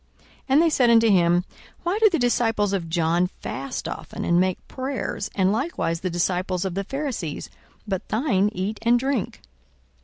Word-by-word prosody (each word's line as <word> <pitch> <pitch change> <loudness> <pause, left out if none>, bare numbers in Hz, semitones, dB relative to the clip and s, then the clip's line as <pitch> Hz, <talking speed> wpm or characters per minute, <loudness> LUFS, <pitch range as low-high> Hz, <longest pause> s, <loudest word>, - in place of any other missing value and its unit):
42:005:033 - - -29 0.2
And 275 +4 +5
they 335 - +4
said 250 -5 +3
unto 230 -1 +5
him, 175 -1 +3 0.4
Why 355 +5 0
do 440 -1 +6
the 345 - 0
disciples 225 -5 +1
of 175 -4 -2
John 170 +1 +2
fast 135 0 -4
often, - - -6
and 170 0 +3
make 185 0 -1
prayers, 260 -6 -4
and 190 -1 +3
likewise 215 - -1
the 185 - -2
disciples 180 +1 -1
of 190 - -2
the 195 +2 -2
Pharisees; 255 - -4 0.4
but 190 -3 -3
thine 215 -5 +2
eat 205 +2 -3
and 235 +1 +4
drink? 265 -3 -2
200 Hz, 175 wpm, -24 LUFS, 180-250 Hz, 0.4 s, do